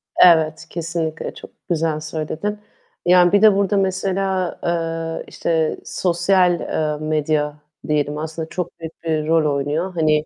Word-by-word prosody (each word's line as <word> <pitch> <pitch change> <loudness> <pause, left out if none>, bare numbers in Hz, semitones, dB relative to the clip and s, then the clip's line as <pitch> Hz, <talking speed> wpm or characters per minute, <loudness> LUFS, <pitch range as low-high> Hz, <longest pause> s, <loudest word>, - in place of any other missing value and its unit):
Evet, 160 -3 +5
kesinlikle. 165 -1 -3
Çok - - -12 0.2
güzel 160 -2 0
söyledin. 155 +6 -4 0.5
Yani 180 0 +6
bir 205 - +4
de 215 -2 +7
burada 200 0 +1
mesela, 190 -1 -1
eee, 165 -1 -2
işte 160 -2 -1
sosyal, 180 0 +2
eee, 150 -1 -2
medya 150 -1 0 0.3
diyelim 150 -1 0
aslında 160 +1 -5
çok 180 -2 -5
büyük 165 0 -9
bir 155 -2 -1
rol 155 -3 +3
oynuyor. 150 +7 -2
Hani, 155 -2 +2
165 Hz, 135 wpm, -20 LUFS, 155-180 Hz, 0.5 s, de